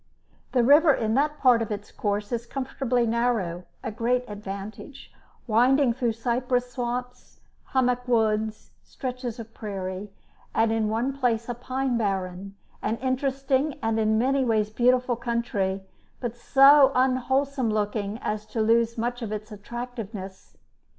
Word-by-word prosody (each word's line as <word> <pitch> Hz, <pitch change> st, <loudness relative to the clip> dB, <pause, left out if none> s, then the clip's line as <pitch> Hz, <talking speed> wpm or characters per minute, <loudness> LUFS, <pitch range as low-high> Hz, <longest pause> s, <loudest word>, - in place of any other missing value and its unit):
The 250 Hz, -2 st, +4 dB
river 295 Hz, +5 st, +7 dB
in 220 Hz, -5 st, 0 dB
that 295 Hz, +4 st, +1 dB
part 250 Hz, -5 st, +4 dB
of 225 Hz, -, -2 dB
its 205 Hz, -1 st, -5 dB
course 205 Hz, 0 st, -2 dB
is 235 Hz, 0 st, -3 dB
comfortably 255 Hz, -2 st, -1 dB
narrow, 225 Hz, -7 st, 0 dB, 0.2 s
a -, -, -3 dB
great 245 Hz, +3 st, 0 dB
advantage, 205 Hz, +4 st, -8 dB, 0.3 s
winding 250 Hz, +3 st, +4 dB
through 240 Hz, -2 st, 0 dB
cypress 245 Hz, +2 st, -1 dB
swamps, 250 Hz, 0 st, -5 dB, 0.3 s
hammock 250 Hz, -1 st, 0 dB
woods, 220 Hz, -2 st, 0 dB
stretches 250 Hz, -3 st, -5 dB
of 225 Hz, -1 st, -9 dB
prairie, 195 Hz, -2 st, -5 dB, 0.5 s
and 225 Hz, 0 st, +3 dB
in 220 Hz, -1 st, +1 dB
one 240 Hz, +5 st, -1 dB
place 235 Hz, -4 st, 0 dB
a 245 Hz, -, -2 dB
pine 255 Hz, +1 st, -2 dB
barren; 195 Hz, -2 st, -3 dB, 0.3 s
an 220 Hz, +2 st, -1 dB
interesting 270 Hz, +2 st, 0 dB
and 225 Hz, 0 st, +1 dB
in 220 Hz, 0 st, +2 dB
many 265 Hz, +4 st, +2 dB
ways 215 Hz, -3 st, +1 dB
beautiful 250 Hz, +2 st, +2 dB
country, 230 Hz, -5 st, -2 dB, 0.4 s
but 240 Hz, -2 st, -4 dB
so 275 Hz, +2 st, +6 dB
unwholesome 260 Hz, 0 st, +1 dB
looking 210 Hz, 0 st, -1 dB
as 215 Hz, 0 st, -3 dB
to 225 Hz, -, -4 dB
lose 230 Hz, +1 st, +2 dB
much 240 Hz, +2 st, -2 dB
of 220 Hz, -3 st, -4 dB
its 215 Hz, +1 st, -5 dB
attractiveness. 210 Hz, -3 st, -7 dB
235 Hz, 140 wpm, -26 LUFS, 215-255 Hz, 0.5 s, river